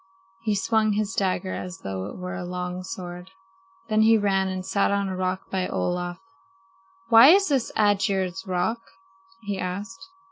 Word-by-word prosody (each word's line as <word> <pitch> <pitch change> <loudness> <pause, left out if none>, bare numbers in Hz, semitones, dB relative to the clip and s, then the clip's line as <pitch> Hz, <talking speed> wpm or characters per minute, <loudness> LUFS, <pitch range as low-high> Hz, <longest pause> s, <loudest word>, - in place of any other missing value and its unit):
He 215 -2 0
swung 215 +1 +2
his 205 -1 -1
dagger 185 -1 -1
as 180 0 -6
though 95 -1 -4
it - - -8
were 180 0 -5
a 190 -1 -5
long 180 0 -4
sword. 180 -1 -7 0.6
Then 215 -1 +2
he 225 +1 +6
ran 195 -2 +1
and 185 -1 -4
sat 195 +1 +1
on 200 0 0
a 190 - -3
rock 185 0 -3
by 185 -1 -1
Olaf. 175 0 -2 0.9
"Why 230 +2 +9
is 390 +4 +6
this 270 -5 0
Aegir's 195 -3 +1
Rock?" 185 +6 0 0.6
he 200 -3 -4
asked. 205 - -5
190 Hz, 165 wpm, -25 LUFS, 180-215 Hz, 0.9 s, Why